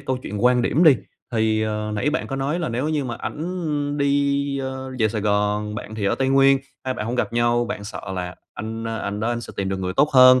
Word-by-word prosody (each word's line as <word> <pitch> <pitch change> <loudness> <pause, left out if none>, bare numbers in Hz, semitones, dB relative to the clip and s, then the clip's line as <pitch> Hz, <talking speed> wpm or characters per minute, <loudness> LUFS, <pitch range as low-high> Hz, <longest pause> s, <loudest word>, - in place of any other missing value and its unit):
câu 130 -2 -2
chuyện 105 -2 -4
quan 125 -1 +5
điểm 160 +8 +3
đi, 145 -6 +8 0.4
thì, 110 -1 +2
ờ, 105 0 -2
nãy 125 +8 +1
bạn 160 - -1
có 135 - -4
nói 140 +5 -1
là 170 - -1
nếu 125 +6 -1
như 150 -3 0
mà 120 - -3
ảnh 150 -4 -3
đi, 140 0 +1
ơ, 130 0 -5
về 110 - +3
Sài 110 0 -2
Gòn, 105 0 0
bạn 110 +1 -6
thì 105 -2 -3
ở - - +2
Tây 135 0 0
Nguyên, 135 0 +5 0.3
hai 130 - -1
bạn 105 -2 -4
hông 120 - -2
gặp 125 - -1
nhau, 120 0 +2
bạn 115 -4 -5
sợ 105 - -6
là 90 -1 -4 0.2
anh, 110 +2 -5
ơ, 115 0 -3
anh 100 -1 -3
đó 115 - 0
anh 120 0 -1
sẽ - - -9
tìm 95 -1 -1
được 95 - -1
người 90 0 -2
tốt 145 +8 +3
hơn, 130 -1 +8
120 Hz, 260 wpm, -23 LUFS, 110-140 Hz, 0.4 s, đi